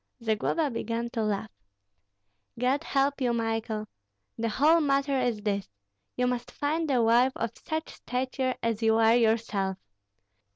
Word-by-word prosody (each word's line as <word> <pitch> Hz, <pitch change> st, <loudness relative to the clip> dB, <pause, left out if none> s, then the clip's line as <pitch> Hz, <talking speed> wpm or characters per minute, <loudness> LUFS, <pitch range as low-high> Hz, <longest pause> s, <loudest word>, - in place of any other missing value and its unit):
Zagloba 235 Hz, +7 st, 0 dB
began 230 Hz, +1 st, -3 dB
to 230 Hz, -, -2 dB
laugh. 215 Hz, -1 st, -2 dB, 1.1 s
"God 260 Hz, +5 st, +1 dB
help 280 Hz, -1 st, 0 dB
you, 245 Hz, -2 st, +2 dB
Michael! 225 Hz, -2 st, -2 dB, 0.5 s
The 230 Hz, 0 st, -1 dB
whole 310 Hz, +9 st, +4 dB
matter 275 Hz, -1 st, +1 dB
is 240 Hz, -5 st, -1 dB
this, 200 Hz, -2 st, -1 dB, 0.5 s
you 250 Hz, -, +1 dB
must 245 Hz, -1 st, -2 dB
find 305 Hz, +4 st, -1 dB
a 250 Hz, -4 st, +3 dB
wife 240 Hz, +3 st, +4 dB
of -, -, -2 dB
such 315 Hz, -1 st, -4 dB
stature 255 Hz, +1 st, -2 dB
as 230 Hz, -1 st, 0 dB
you 220 Hz, 0 st, +4 dB
are 225 Hz, 0 st, +5 dB
yourself. 220 Hz, -5 st, +1 dB
240 Hz, 140 wpm, -28 LUFS, 225-275 Hz, 1.1 s, are